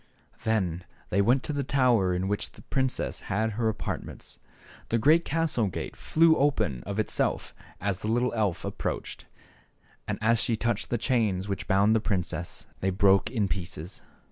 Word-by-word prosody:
Then 90 -6 0 0.3
they 100 - +3
went 125 +6 +3
to 150 - -2
the 140 -1 -1
tower 125 -8 +3
in 90 +1 -1
which 105 +1 -2
the - - -15
princess 130 -1 -1
had 110 +2 +1
her 110 +1 0
apartments. 110 -1 -6 0.5
The 115 - +2
great 155 +9 +5
castle 155 -9 +1
gate 90 - -5
flew 165 0 +4
open 110 - +1
of 100 0 -3
itself 110 - -1 0.3
as 100 -1 -1
the - - -5
little 120 +3 +1
elf 105 -6 0
ap - - -6
proached, - - -4 0.8
and - - -2
as 115 +1 +3
she 115 - +1
touched 115 -1 -1
the 120 - +1
chains 110 -6 0
which 100 -1 -4
bound 100 +3 +4
the - - +4
princess 90 -4 -3
they 95 - 0
broke 95 +1 +4
in 110 -5 0
pieces. 90 -2 -5
110 Hz, 170 wpm, -28 LUFS, 95-120 Hz, 0.8 s, great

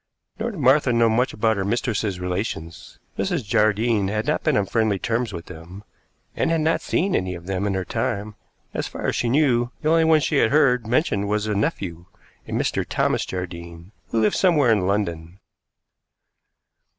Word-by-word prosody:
Nor 225 +2 -1
did 200 -7 -7
Martha 135 0 +4
know 115 -1 +3
much 120 +4 +1
of 105 - -13
her 110 -3 +2
mistress's 105 -3 -1
relations. 90 -3 -5 0.2
Mrs. 120 - -1
Jardine 110 -1 +2
had 105 +2 -2
not - - 0
been - - +2
on 100 - +1
friendly 110 0 +1
terms 115 +3 -1
with 85 -3 -7
them, 90 +4 -11 0.5
and - - 0
had 165 -1 +1
not 160 +1 +1
seen 190 +3 0
any 90 0 -1
of 85 0 -10
them 95 +1 -2
in 100 - -1
her 95 -1 -2
time, 105 +4 -2 0.4
as - - -2
far - - -7
as - - 0
she 120 - 0
knew; 120 -3 +2
the 155 - +2
only 165 0 +4
one 160 -1 +5
she 150 0 0
had 110 - +4
heard 125 -5 +3
mentioned 110 -6 +1
was 105 0 0
a 105 - -1
nephew, 95 - -2 0.4
a - - -9
Mr. - - 0
Thomas - - 0
Jardine, 85 -1 -7 0.2
who 115 - 0
lived 105 - +2
somewhere 150 -10 +3
in 100 -4 +2
London. 85 -4 -2
105 Hz, 185 wpm, -23 LUFS, 95-125 Hz, 0.5 s, one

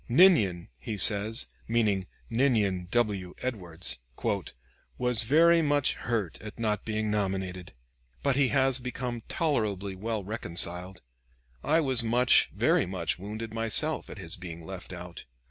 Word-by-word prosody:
"Ninian," 115 - +4
he 105 - -5
says, 105 +3 +4 0.2
meaning 105 -5 +1 0.2
Ninian 110 -8 +1
W. 100 -6 -1
Edwards, 90 - -2 1.0
"was 125 -2 +2
very 165 +7 +4
much 145 -2 +2
hurt 110 -8 -3
at 105 -1 -9
not 105 -3 -1
being 110 -1 -2
nominated, 95 -4 -3 0.5
but 140 -2 +1
he 140 -1 +3
has 135 -1 +3
become 125 -1 -5
tolerably 105 - -1
well 110 +2 -4
reconciled. 90 -2 0 0.6
I 160 +2 +2
was 130 -5 +4
much, 120 +2 +3
very - - +1
much, 90 -2 -3
wounded 110 +3 -7
myself, 115 +8 +1
at - - -9
his 85 -4 -3
being 85 -2 -9
left 95 0 -9
out. 90 -1 -9
110 Hz, 130 wpm, -28 LUFS, 95-125 Hz, 1.0 s, Ninian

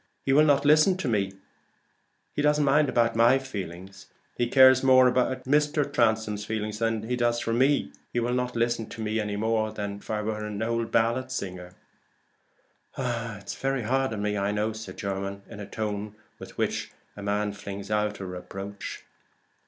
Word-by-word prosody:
He 135 - +3
will 150 +2 +6
not 145 -1 +3
listen 155 +5 +5
to 185 - -3
me; 100 -5 +1 1.0
he - - -1
doesn't 150 0 +3
mind 145 +1 +4
about 115 -1 +2
my 120 +3 +5
feelings. 95 -6 -7 0.3
He 120 - 0
cares 130 0 +7
more 130 -1 +6
for 125 +1 +2
Mr. 145 +1 +1
Transome 110 -4 +2 0.3
than 110 0 -2
he 125 - 0
does 120 -1 +1
for 115 - -2
me. 135 +4 +2 0.2
He 120 - 0
will 120 +1 0
not 125 0 -1
listen 120 -1 0
to - - -10
me 110 +1 -1
any 105 -1 -2
more 110 0 0
than 100 -1 -4
if - - -16
I 105 -1 -1
were 110 0 -3
an 105 0 -4
old 115 0 -1
ballad 120 +3 +1
singer." 90 -7 -5 1.2
"It's 115 -5 -3
very 135 -2 -1
hard 130 +3 +1
on 105 -2 -3
me, 105 0 0
I 100 +1 0
know," 105 +1 -1
said 110 -4 -8
Jermyn, 100 0 -4
in 105 - -10
the 100 - -7
tone 105 0 -4 0.2
with - - -11
which - - -1 0.3
a 105 - -8
man 105 +1 0
flings 100 0 -7
out 105 0 0
a 95 - -5
reproach. 95 +2 -7
110 Hz, 180 wpm, -27 LUFS, 105-130 Hz, 1.2 s, cares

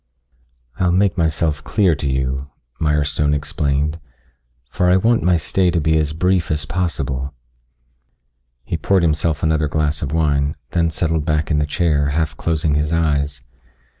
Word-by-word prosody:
"I'll 90 -1 +2
make 95 +1 +2
myself 80 -3 0
clear 95 -6 +2
to 70 -1 -2
you," 65 +1 -2 0.3
Mirestone 75 -1 +1
explained, 70 +1 -1 0.7
"For 90 +7 0
I 90 - +5
want 115 +4 +2
my 90 0 +3
stay 90 +3 +1
to 85 -1 +1
be 80 0 +1
as 75 -1 0
brief 90 +1 +1
as 75 -1 -1
possible." 75 -6 -3 1.3
He - - -3
poured 95 -3 +2
himself 80 -1 0
another 80 -1 +2
glass 75 0 -1
of 70 - -3
wine, 75 -3 +1 0.2
then 85 -2 +1
settled 80 -1 -1
back 75 -2 0
in 75 - +2
the 75 - 0
chair, 75 -2 +1
half 75 0 -1
closing 80 0 0
his 75 +1 0
eyes. 75 -5 0
75 Hz, 155 wpm, -19 LUFS, 75-85 Hz, 1.3 s, I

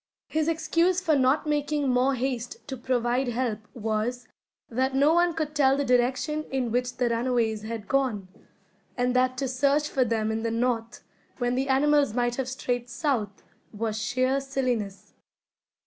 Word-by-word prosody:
His 315 0 0
excuse 335 +3 +2
for 330 -5 +2
not 265 +3 +2
making 295 -1 0
more 255 +2 +2
haste 250 -1 -4
to 270 - -4
provide 250 +1 0
help 240 -3 -1 0.2
was, 225 +2 -2 0.4
that 260 +3 -1
no 285 +4 +4
one 345 -1 +3
could 310 -2 -2
tell 275 -2 +3
the 285 - 0
direction 255 +5 +1
in 255 -3 -2
which 250 +1 -1
the 250 - +1
runaways 230 -2 0
had 220 -1 -6
gone, 255 -8 0 0.7
and 250 0 +1
that 255 0 +2
to 270 0 -1
search 280 +3 +2
for 265 - +1
them 220 -2 0
in 220 0 -2
the 230 - -1
north, 230 0 -1 0.3
when 245 -1 0
the 265 +2 -1
animals 285 -2 +3
might 240 -1 0
have 260 -1 -2
strayed 245 -2 -3
south, 240 -6 -2 0.3
was 215 0 -2
sheer 255 +4 +1
silliness. 250 -7 -3
255 Hz, 165 wpm, -26 LUFS, 235-275 Hz, 0.7 s, no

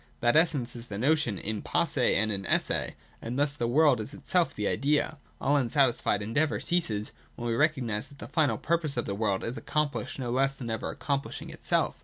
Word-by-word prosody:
That 120 +1 +3
essence 145 -7 +2
is 120 0 -8
the 100 - -5
notion 135 -3 +2
in 105 +3 -3
posse - - +1
and 110 +1 +2
in 100 -1 -3
esse: - - 0 0.3
and 120 +3 -4
thus 145 0 +2
the 120 -4 -1
world 140 -1 +4
is 120 +8 -8
itself 170 -4 +1
the 105 -1 -1
idea. 150 +1 +1 0.2
All 145 +2 +2
unsatisfied 120 -5 +2
endeavour 145 +9 0
ceases, 110 -12 0 0.2
when 120 - -4
we 115 - 0
recognise 125 -6 +1
that 140 - -16
the - - -8
final 150 0 +1
purpose 160 -5 -1
of 120 - 0
the 100 - -3
world 100 -2 0
is 120 +4 -4
accomplished 150 -2 -2
no 125 -3 -3
less 135 +2 +2
than 120 -4 -5
ever 110 - -3
accomplishing 140 -1 -3
itself. - - 0
130 Hz, 200 wpm, -28 LUFS, 115-150 Hz, 0.3 s, world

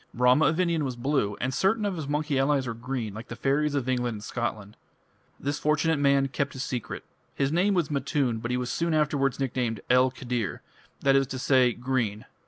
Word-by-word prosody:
Rama 125 +5 +5
of 160 - 0
India 170 -3 +2
was 135 -4 -2
blue, 120 -5 0
and 130 +2 -1
certain 210 - +2
of 200 -2 -1
his 155 -4 -5
monkey 150 -1 0
allies 135 0 +2
were 115 - -3
green, 120 -2 -4
like 110 +3 -8
the 115 - -7
fairies 145 +3 +1
of 135 -3 -1
England 125 -2 0
and 105 - -8
Scotland. 110 -3 -4 0.6
This 145 +1 -2
fortunate 155 0 +2
man 140 -1 +3
kept 140 +1 -2
his 130 - -4
secret. 125 -4 -4 0.3
His 135 0 0
name 190 +5 +2
was 170 -5 0
Matun, 140 -4 0
but 120 +1 -4
he 125 - 0
was 125 +4 -3
afterwards 150 -5 +1
nicknamed 125 -4 -1
"'El 125 +1 +5
Khidr', 125 -6 -3 0.4
that 135 0 +4
is 135 -1 +3
to 130 - -5
say, 130 -2 +3
'Green'". 120 -4 -2
135 Hz, 200 wpm, -27 LUFS, 125-150 Hz, 0.6 s, Rama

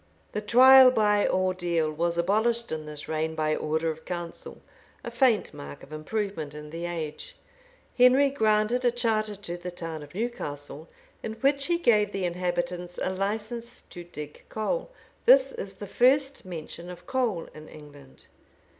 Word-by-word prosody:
The 210 - -3
trial 260 +4 +8
by 210 -4 +3
ordeal 175 -4 0
was 170 +2 -1
abolished 220 +6 +1
in 155 -1 -4
this 150 -1 -8
reign 160 0 -2
by 155 -1 0
order 160 +1 -1
of 160 0 -10
council; 175 -1 -7 0.4
a - - -6
faint 250 -6 +2
mark 70 0 -9
of 145 - -12
improvement 160 -2 -4
in 150 0 -9
the 170 +1 -4
age.[*] 160 -3 -6 0.6
Henry 260 +3 +5
granted 220 -1 +2
a 245 - +5
charter 220 -3 0
to 185 -3 -6
the 175 +1 -6
town 165 -3 -6
of 145 +3 -12
Newcastle, 155 - -5 0.3
in 220 - -4
which 275 +5 +1
he 345 0 +2
gave 215 -10 +3
the 195 -2 -1
inhabitants 175 0 -3
a 185 - -1
license 220 +5 -4
to 175 - -8
dig 150 -4 -9
coal. 225 - -2 0.4
This - - +7
is 470 -1 -6
the - - -8
first 270 +1 +2
mention 170 0 -8
of 180 - -10
coal 235 -10 -1
in 155 0 -11
England. 145 -3 -14
185 Hz, 160 wpm, -27 LUFS, 160-235 Hz, 0.6 s, trial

